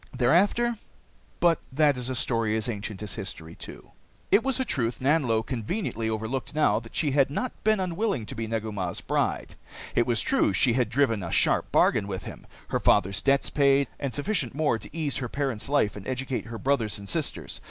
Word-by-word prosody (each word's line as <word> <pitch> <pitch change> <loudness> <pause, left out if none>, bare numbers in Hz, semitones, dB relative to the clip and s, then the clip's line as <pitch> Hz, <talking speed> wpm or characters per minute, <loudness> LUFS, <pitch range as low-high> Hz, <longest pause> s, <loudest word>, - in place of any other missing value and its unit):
Thereafter 200 - +3 0.6
But 170 -2 +4
that 145 +1 +3
is 125 0 -3
a 130 - -2
story 115 -3 +1
as 110 - -2
ancient 105 -2 -5
as 105 - -4
history 80 -4 -6
too. - - -10 0.4
It 210 - +6
was 270 0 +1
a 260 - 0
truth 120 - -1
Nanlo 130 -5 +2
conveniently 115 - -2
overlooked 110 +6 -3
now 150 -9 +3
that 115 0 -14
she 150 -3 +2
had 140 0 +3
not 250 - -2
been 215 -1 +3
unwilling 185 - -1
to - - -7
be 115 0 -4
Negu 110 -1 -2
Mah's 95 -4 -3
bride. - - -1 0.4
It 120 - +2
was 115 -3 +2
true - - +2
she 115 +6 +3
had 120 -3 +1
driven 115 -4 +2
a 85 - -4
sharp - - +2
bargain 105 -3 +3
with 95 -2 -4
him - - -10 0.2
her - - 0
father's 100 +2 +3
debts 140 0 +2
paid, 140 -1 +3
and 140 -2 -2
sufficient 145 - -1
more 145 -7 +1
to - - -12
ease 155 -3 -2
her 125 -3 -3
parents' 135 -3 -2
life 140 -8 +2
and 105 - -8
educate 130 0 -3
her 115 0 -6
brothers 120 -5 0
and 100 -1 -9
sisters. - - -3
125 Hz, 200 wpm, -27 LUFS, 110-145 Hz, 0.6 s, It